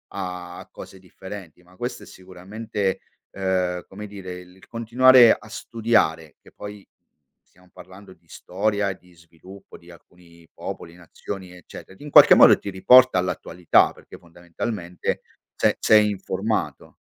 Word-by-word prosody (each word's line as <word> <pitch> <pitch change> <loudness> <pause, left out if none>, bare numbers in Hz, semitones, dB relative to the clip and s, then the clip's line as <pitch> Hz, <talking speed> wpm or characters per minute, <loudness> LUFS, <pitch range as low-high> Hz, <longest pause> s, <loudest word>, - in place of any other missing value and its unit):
a 90 -1 -7
cose 95 - -13
differenti, 95 -1 -12
ma 90 +1 -23
questo 120 +3 -6
è - - -13
sicuramente, 95 +2 -5 0.3
uhm, 90 -2 -2
come 105 +2 -10
dire, 95 -3 -9
il 90 +1 -19
continuare 120 +1 +5
a - - -3
studiare; 105 -9 -1
che - - -20
poi 105 -1 -11 0.6
stiamo 90 0 -27
parlando 95 +1 -15
di - - -32
storia 100 +2 -2
e 95 - -6
di 90 0 -24
sviluppo 85 +4 -16
di 85 - -20
alcuni 85 -1 -20
popoli, 85 - -9
nazioni, 90 +2 -9
eccetera, 90 +1 -13
che - - -15
in 150 - -8
qualche - - +8
modo - - +7
ti 100 - -7
riporta 125 +5 +5
all'attualità, 90 -1 +1
perché - - -15
fondamentalmente 85 +2 -6 0.3
se - - +1
sei 105 -1 +4
informato. 100 +2 -4
95 Hz, 140 wpm, -22 LUFS, 90-105 Hz, 0.6 s, qualche